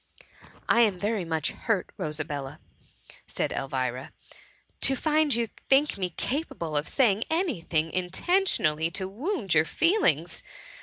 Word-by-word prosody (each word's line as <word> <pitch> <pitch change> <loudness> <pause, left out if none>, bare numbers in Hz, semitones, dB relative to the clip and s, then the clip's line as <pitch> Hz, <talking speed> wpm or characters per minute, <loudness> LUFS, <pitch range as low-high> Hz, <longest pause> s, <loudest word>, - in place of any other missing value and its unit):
'' - - -23
*' - - -24
I 235 - +5
am 205 -6 +3
Ji^ery 205 -3 -1
much 160 -2 -1
hurt, 215 -5 -2
Rosabella," 150 -3 -4 0.7
said - - -2
Elvira, 130 -1 -3 0.3
*' - - -34
to 270 - +4
find 305 0 +2
you 235 -1 0 0.2
think 280 +3 +4
me 185 -2 -2
capable 175 - -3
of 145 +1 0
saying 225 -5 +2
any 320 - 0
thing 160 -1 -1
intentionally 180 - +1
to 190 +2 -4
wound 225 - -2
your 160 0 +4
feelings. 350 - +1
190 Hz, 145 wpm, -27 LUFS, -, 0.7 s, I